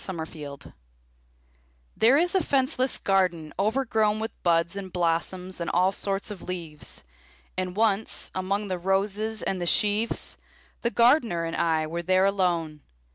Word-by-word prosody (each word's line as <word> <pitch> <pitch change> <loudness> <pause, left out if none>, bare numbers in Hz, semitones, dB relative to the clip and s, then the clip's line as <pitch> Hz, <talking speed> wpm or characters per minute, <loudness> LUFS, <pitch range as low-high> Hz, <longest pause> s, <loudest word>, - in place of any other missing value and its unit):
The 190 - -4
Garden 150 -4 -8 1.2
There 240 +5 +5
is 350 +4 +2
a 380 - +4
fenceless 265 -3 +1
garden 180 -5 0
overgrown 215 -1 +1
With 225 +1 -3
buds 170 +1 +2
and 195 -2 -6
blossoms 180 +2 -1
and 170 - -2
all 185 +2 +3
sorts 195 +1 -2
of 200 - -8
leaves; 165 - -7 0.5
And 185 -1 -3
once, 215 -1 +1
among 195 +3 -1
the 185 -2 -3
roses 200 +4 0
and 185 -2 -2
the 175 - -1
sheaves, 210 +5 +1 0.4
The 235 - +1
Gardener 235 - +3
and 165 - -3
I 160 -2 +1
were 170 +2 -4
there 185 +2 +3
alone. 175 -6 0
190 Hz, 145 wpm, -26 LUFS, 170-215 Hz, 1.2 s, There